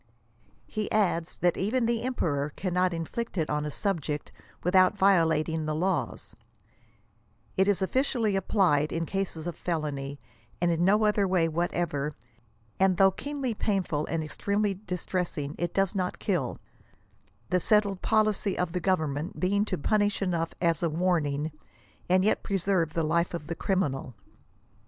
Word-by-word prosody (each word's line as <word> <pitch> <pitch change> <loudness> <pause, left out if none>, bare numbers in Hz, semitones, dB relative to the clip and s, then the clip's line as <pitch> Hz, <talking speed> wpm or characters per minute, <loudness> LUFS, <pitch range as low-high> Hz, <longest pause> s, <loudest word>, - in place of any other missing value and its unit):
He 215 -2 -4
adds 180 -6 +1
that 175 -1 +2
even 230 +6 +1
tlie 230 0 0
emperor 150 - -1
cannot 180 -1 +1
inflict 175 +7 -4
it 160 -2 0
on 150 0 -1
a - - -2
subject, 155 -4 -2 0.3
without 185 +3 +4
violating 160 -5 +3
the 155 - -1
laws^ 185 +4 -2 0.6
" - - -38 0.3
It 190 0 +3
is 205 -1 +2
oflScially 230 0 +1
applied, 180 -6 +2
in 165 0 -1
cases 185 -4 -3
of 175 - -3
felony, 145 -4 -3 0.4
and 175 0 +2
in 165 +1 +1
no 210 +4 +4
other 210 -2 +3
way 180 -3 +2
whatever, 160 -3 -1 0.7
and 190 -2 +3
though 195 +1 +6
keenly 275 +3 -3
painful 190 -8 -1
and 165 -1 -1
extremely 200 +6 -1
distressing, 180 -6 -3
it 175 -1 -1
does 195 -2 +1
not 185 -2 -2
kill; 170 - -1 0.9
the 180 - +4
settled 200 -1 +2
policy 215 -2 +1
of 180 -2 -1
tl^ 180 +1 -2
government 160 -4 -1
being 200 +3 +2
to - - -2
punish 205 +6 +1
enough 170 -4 -1
as 170 -2 +1
a 170 - +1
warning, 155 -3 0 0.6
and 185 +1 +4
yet 215 - +2
preserve 185 -5 0
the 165 - +1
life 170 +3 +1
of 170 - -6
the 165 +2 -4
criminal. 140 - -1
180 Hz, 150 wpm, -28 LUFS, 160-200 Hz, 0.9 s, though